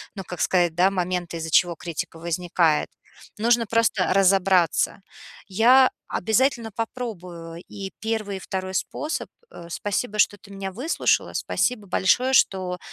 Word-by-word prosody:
ну, 195 Hz, -, -6 dB
как 180 Hz, -2 st, -8 dB
сказать, 175 Hz, -3 st, +2 dB
да, 180 Hz, +3 st, +4 dB
моменты, 180 Hz, -2 st, -2 dB
из-за 165 Hz, 0 st, -5 dB
чего 175 Hz, +2 st, +4 dB
критика 165 Hz, 0 st, -6 dB
возникает. 170 Hz, -2 st, +1 dB, 0.5 s
Нужно 230 Hz, +1 st, +2 dB
просто 225 Hz, -5 st, +2 dB
разобраться. 190 Hz, -2 st, +3 dB, 0.5 s
Я 245 Hz, +7 st, +5 dB, 0.2 s
обязательно 230 Hz, +2 st, 0 dB
попробую 180 Hz, -8 st, -6 dB
и 195 Hz, -2 st, -7 dB
1, 220 Hz, -3 st, -3 dB
и -, -, -8 dB
2 190 Hz, 0 st, -5 dB
способ. 300 Hz, +10 st, -3 dB, 0.2 s
Э, 170 Hz, -, -11 dB
спасибо, 205 Hz, +4 st, -3 dB
что 205 Hz, -, +3 dB
ты 200 Hz, -, -17 dB
меня 195 Hz, -1 st, -5 dB
выслушала, 260 Hz, -, 0 dB
спасибо 220 Hz, -6 st, -1 dB
большое, 245 Hz, +8 st, +2 dB
что 185 Hz, -6 st, +2 dB
190 Hz, 135 wpm, -24 LUFS, 175-225 Hz, 0.5 s, Я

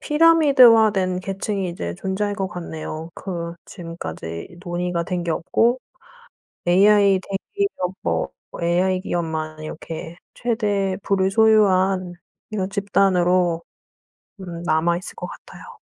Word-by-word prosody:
피라미드화된 245 Hz, -, +5 dB
계층이 195 Hz, 0 st, -3 dB
이제 85 Hz, -, -5 dB
존재할 205 Hz, -, -2 dB
것 195 Hz, -2 st, -2 dB
같네요. 160 Hz, -2 st, -6 dB
그 170 Hz, -3 st, -5 dB
지금까지 125 Hz, -, -7 dB
논의가 175 Hz, -1 st, -2 dB
된 175 Hz, 0 st, -3 dB
게 170 Hz, -, -2 dB
없고 230 Hz, +9 st, +1 dB, 0.9 s
AI 200 Hz, +1 st, +5 dB
대기업 195 Hz, -, -3 dB
뭐 -, -, 0 dB, 0.3 s
AI 185 Hz, +2 st, +2 dB
기업만 160 Hz, -4 st, -3 dB
이렇게 165 Hz, +2 st, -7 dB, 0.2 s
최대 205 Hz, -5 st, 0 dB
부를 190 Hz, -1 st, +1 dB
소유한 195 Hz, -4 st, +3 dB, 0.4 s
이런 195 Hz, -3 st, -2 dB
집단으로 185 Hz, -4 st, +2 dB, 0.8 s
음 175 Hz, -2 st, -7 dB
남아있을 170 Hz, +2 st, 0 dB
것 -, -, -5 dB
같아요. -, -, -12 dB
185 Hz, 250 characters per minute, -22 LUFS, 170-200 Hz, 0.9 s, 피라미드화된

